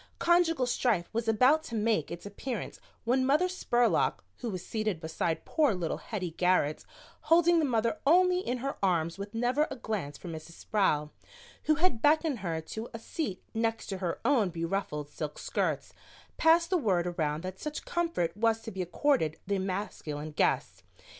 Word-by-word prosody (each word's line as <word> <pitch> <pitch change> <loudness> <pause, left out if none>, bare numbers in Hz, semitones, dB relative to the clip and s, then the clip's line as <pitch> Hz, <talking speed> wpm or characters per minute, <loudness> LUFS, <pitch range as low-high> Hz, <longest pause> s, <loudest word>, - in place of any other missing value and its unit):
Conjugal 335 -5 +3
strife 235 -7 0
was 230 0 -1
about 255 +8 +5
to 230 - -5
make 215 -7 +1
its 170 +2 -7
appearance 215 +3 -5 0.2
when 255 +3 +2
Mother 295 +7 +3
Spurlock, 245 -10 +1
who 240 - -4
was 185 -4 -5
seated 215 -6 -2
beside 160 0 -2
poor 295 -9 +2
little 170 -3 -2
Hettie 185 -6 -4
Garrett, 180 -5 +2 0.5
holding 340 +1 +6
the 315 - +2
Mother 230 +2 0
Only 360 +3 +5
in 255 -9 -2
her 275 - -2
arms 170 -2 +1
with 200 +2 -6
never 250 +6 +2
a - - -5
glance 210 - -4
for - - -10
Mrs. 165 0 -7
Sproul, 155 -7 0 0.5
who 310 - +4
had 310 -8 +1
beckoned 300 -2 +3
her 165 -4 -2
to 220 +8 -6
a - - -3
seat 225 - -4
next 225 0 -1
to 195 -2 -3
her 175 -3 -2
own 240 -7 +3
beruffled 165 -3 -3
silk 150 0 -6
skirts, - - -2 0.4
passed 335 +2 +4
the 365 - +3
word 190 - +1
around 160 -3 -1
that 185 +1 -6
such 300 0 -5
comfort 335 - -1
was 225 +1 +2
to 225 - -7
be 190 - -4
accorded 180 - +1
the 200 0 0
masculine 185 -6 -4
guests. - - 0
220 Hz, 175 wpm, -30 LUFS, 175-275 Hz, 0.5 s, holding